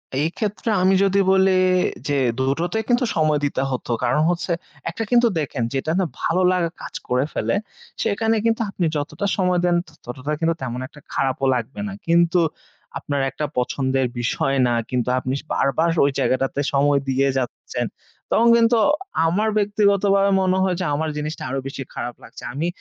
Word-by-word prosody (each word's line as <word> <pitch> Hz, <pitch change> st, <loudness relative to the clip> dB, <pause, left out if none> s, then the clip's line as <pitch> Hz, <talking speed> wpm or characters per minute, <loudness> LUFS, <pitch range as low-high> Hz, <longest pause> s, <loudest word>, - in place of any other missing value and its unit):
এক্ষেত্রে 185 Hz, -, -2 dB
আমি 190 Hz, +1 st, +4 dB
যদি 195 Hz, 0 st, +2 dB
বলি 190 Hz, 0 st, +4 dB, 0.6 s
যে 145 Hz, -, +1 dB, 0.2 s
২ 130 Hz, -, 0 dB, 0.2 s
টোতেই 200 Hz, +6 st, -1 dB
কিন্তু 245 Hz, +1 st, +3 dB
সময় 155 Hz, -2 st, +2 dB
দিতে 140 Hz, -2 st, -1 dB
হতো 125 Hz, -1 st, -3 dB
কারণ 125 Hz, +5 st, +2 dB
হচ্ছে, 175 Hz, +1 st, -1 dB, 0.4 s
একটা 225 Hz, -, -4 dB
কিন্তু 240 Hz, 0 st, +5 dB
দেখেন 140 Hz, -5 st, -2 dB
যেটা 135 Hz, +4 st, -1 dB
না, 185 Hz, -, +2 dB, 0.2 s
ভালো 180 Hz, +3 st, +1 dB
লাগা 180 Hz, -2 st, +1 dB
কাজ -, -, -8 dB
করে 125 Hz, +2 st, +1 dB
ফেলে, -, -, 0 dB, 0.5 s
সেখানে 225 Hz, +2 st, +1 dB
কিন্তু 230 Hz, 0 st, +2 dB
আপনি 185 Hz, -3 st, -2 dB
যতটা 145 Hz, +7 st, -3 dB
সময় 180 Hz, -1 st, +2 dB
দেন, 175 Hz, -1 st, +3 dB, 0.3 s
ততটা 130 Hz, +4 st, -5 dB
কিন্তু 165 Hz, 0 st, +1 dB
তেমন 125 Hz, -1 st, -4 dB
একটা 150 Hz, -, -16 dB
খারাপও 135 Hz, 0 st, 0 dB
লাগবে 115 Hz, -3 st, -4 dB
না 95 Hz, -, -5 dB
কিন্তু 170 Hz, +1 st, +4 dB, 0.6 s
আপনার 140 Hz, -1 st, -2 dB
একটা 150 Hz, +3 st, -3 dB
পছন্দের 130 Hz, +1 st, 0 dB
বিষয় 135 Hz, +3 st, 0 dB
না, 120 Hz, -, +1 dB, 0.2 s
কিন্তু 125 Hz, -1 st, -1 dB
আপনি 130 Hz, 0 st, -3 dB
স -, -, -31 dB
বারবার 160 Hz, +5 st, +1 dB, 0.2 s
ওই 140 Hz, -, +2 dB
জায়গাটাতে 135 Hz, +2 st, 0 dB
সময় 140 Hz, 0 st, +3 dB
দিয়ে 135 Hz, +1 st, +2 dB
যাচ্ছেন, 125 Hz, -2 st, -3 dB, 0.5 s
তখন 230 Hz, +2 st, +4 dB
কিন্তু 230 Hz, 0 st, +4 dB, 0.5 s
আমার 205 Hz, +7 st, +1 dB
ব্যক্তিগতভাবে 200 Hz, -1 st, +3 dB
মনে 185 Hz, 0 st, +2 dB
হয় 185 Hz, -1 st, +1 dB
যে 180 Hz, -, -1 dB
আমার 160 Hz, +2 st, -1 dB
জিনিসটা 150 Hz, +1 st, -4 dB
আরো 135 Hz, -, -2 dB
বেশি 135 Hz, 0 st, -5 dB
খারাপ 120 Hz, 0 st, -5 dB
লাগছে। -, -, -12 dB
আমি 155 Hz, +5 st, -1 dB
160 Hz, 170 wpm, -22 LUFS, 135-195 Hz, 0.6 s, কিন্তু